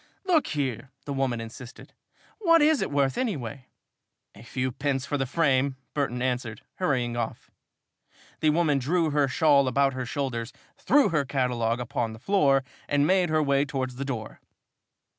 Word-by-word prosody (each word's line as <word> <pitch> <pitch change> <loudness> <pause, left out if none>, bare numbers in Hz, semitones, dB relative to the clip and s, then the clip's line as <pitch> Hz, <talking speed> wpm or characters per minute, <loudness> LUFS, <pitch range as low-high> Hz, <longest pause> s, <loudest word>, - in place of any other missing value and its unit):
"Look 345 -5 +3
here," 140 -2 -3 0.2
the 140 - -3
woman 135 -3 -1
insisted, 115 +2 -10 0.5
"what 335 -6 +5
is 305 -2 +4
it - - -1
worth, 140 -2 +1
anyway?" 140 - -3 0.7
"A 100 - -14
few 130 +2 -3
pence 135 0 -2
for 145 - -2
the 135 -2 -1
frame," 140 -2 +1 0.2
Burton 125 -4 -1
answered, 125 -4 -2
hurrying 125 -9 0
off. 115 -2 -5 0.9
The 155 - +3
woman 150 -3 +2
drew 160 +4 +1
her 145 -1 +2
shawl 140 0 +3
about 135 +2 +2
her 130 -1 -4
shoulders, 120 -4 -3 0.2
threw 285 +1 +3
her 155 -4 +1
catalogue 125 -4 0
upon 120 -2 -2
the 110 - -11
floor 140 - +3 0.3
and 145 0 +3
made 185 +1 +3
her 155 0 +2
way 140 -1 +2
towards 130 -3 -4
the 140 - -3
door. 120 -6 -5
135 Hz, 160 wpm, -26 LUFS, 125-150 Hz, 0.9 s, what